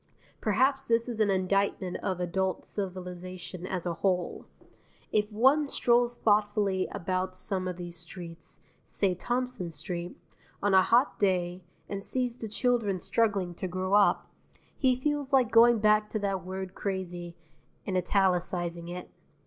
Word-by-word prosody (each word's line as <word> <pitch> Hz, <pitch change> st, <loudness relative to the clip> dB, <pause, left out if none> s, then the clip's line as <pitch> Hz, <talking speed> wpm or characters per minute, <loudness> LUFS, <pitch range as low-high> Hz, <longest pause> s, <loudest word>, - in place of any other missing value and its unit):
Perhaps 265 Hz, +6 st, +2 dB
this 230 Hz, +1 st, +2 dB
is 235 Hz, -3 st, -4 dB
an 215 Hz, -2 st, +3 dB
indictment 190 Hz, -1 st, 0 dB
of 185 Hz, -2 st, -3 dB
adult 185 Hz, +1 st, -1 dB
civilization 185 Hz, -2 st, -6 dB
as 185 Hz, -2 st, -3 dB
a 175 Hz, -, -1 dB
whole. 180 Hz, 0 st, -1 dB, 0.6 s
If 210 Hz, 0 st, +1 dB
one 265 Hz, +7 st, +4 dB
strolls 240 Hz, -2 st, +3 dB
thoughtfully 205 Hz, -3 st, +2 dB
about 185 Hz, +1 st, -2 dB
some 185 Hz, 0 st, -2 dB
of 180 Hz, -1 st, -4 dB
these 175 Hz, -1 st, -4 dB
streets 170 Hz, -1 st, -7 dB, 0.2 s
say 195 Hz, -3 st, 0 dB
Thompson 245 Hz, -1 st, -2 dB
Street 170 Hz, +3 st, -4 dB, 0.4 s
on 205 Hz, 0 st, +1 dB
a 190 Hz, -, +8 dB
hot 240 Hz, +8 st, +3 dB
day, 180 Hz, -2 st, +1 dB, 0.3 s
and 200 Hz, -1 st, -5 dB
sees 250 Hz, 0 st, -1 dB
the 230 Hz, -, -6 dB
children 215 Hz, -3 st, 0 dB
struggling 195 Hz, -3 st, 0 dB
to 185 Hz, -, -4 dB
grow 185 Hz, +2 st, -2 dB
up, 205 Hz, 0 st, +4 dB, 0.5 s
he 260 Hz, -2 st, +3 dB
feels 290 Hz, 0 st, -1 dB
like 255 Hz, -4 st, +4 dB
going 235 Hz, +1 st, +7 dB
back 210 Hz, 0 st, +3 dB
to -, -, -2 dB
that 195 Hz, -3 st, -2 dB
word 190 Hz, 0 st, -5 dB
CRAZY 180 Hz, -3 st, -4 dB, 0.5 s
and 190 Hz, -, -2 dB
italicizing 180 Hz, -2 st, 0 dB
it. 175 Hz, +1 st, -7 dB
190 Hz, 145 wpm, -29 LUFS, 180-220 Hz, 0.6 s, a